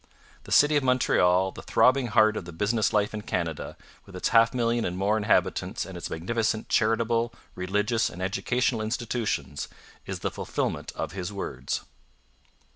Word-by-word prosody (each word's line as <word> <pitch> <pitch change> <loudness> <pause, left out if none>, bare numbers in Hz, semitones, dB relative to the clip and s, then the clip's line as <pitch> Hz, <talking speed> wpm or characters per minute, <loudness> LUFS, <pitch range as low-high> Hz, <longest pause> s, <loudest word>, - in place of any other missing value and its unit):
The - - -11
city 150 +1 +5
of 145 - 0
Montreal, 95 -7 +3
the - - -10
throbbing 130 0 +3
heart 110 -1 +4
of 95 - -4
the 85 - -8
business 105 +6 +1
life 105 0 +1
of 105 -1 -6
Canada, 80 -3 -3 0.3
with 95 - -12
its 90 - -1
half 115 0 +5
million 120 -1 0
and 90 0 -2
more 100 +3 +2
inhabitants 105 -1 +1
and - - -9
its - - -5
magnificent 110 +6 -1
charitable, 115 +1 +2 0.2
religious, 105 +5 0
and 90 - -10
educational 115 +5 0
institutions, 110 - -2 0.4
is - - -5
the - - -1
fulfilment - - -3
of - - -3
his 95 -1 -5
words. 65 -10 -4
110 Hz, 160 wpm, -27 LUFS, 95-115 Hz, 0.4 s, city